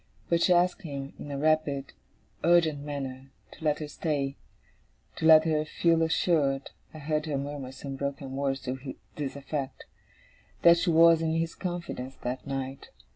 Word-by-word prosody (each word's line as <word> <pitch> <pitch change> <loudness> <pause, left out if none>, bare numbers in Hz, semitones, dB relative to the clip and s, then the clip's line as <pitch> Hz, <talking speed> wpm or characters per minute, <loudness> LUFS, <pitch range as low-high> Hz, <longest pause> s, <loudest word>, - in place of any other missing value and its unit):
But 170 -1 +2
she 180 - +4
asked 175 +1 +3
him, 140 -5 -6
in 145 - -7
a 140 - -3
rapid, 145 -2 +1 0.5
urgent 165 -3 +4
manner, 135 -2 -6 0.2
to - - -13
let 150 -1 +2
her 155 - -5
stay 145 -3 -2 0.8
to 160 - +1
let 155 -1 +9
her 155 -1 +2
feel 165 +1 +2
assured 155 -4 +1 0.2
(I - - -10
heard 155 +1 -2
her 145 -2 -1
murmur 140 -1 -5
some 135 +1 -7
broken 140 -1 -4
words 135 -1 -1
to 130 +1 -5 0.2
this 140 -3 -4
effect) 140 -1 -5 0.8
that 170 0 +7
she 175 - +1
was 165 0 +6
in 160 -1 0
his 165 0 -1
confidence 170 -8 -5
that 125 +3 -4
night. 135 0 -4
145 Hz, 165 wpm, -28 LUFS, 135-160 Hz, 0.8 s, let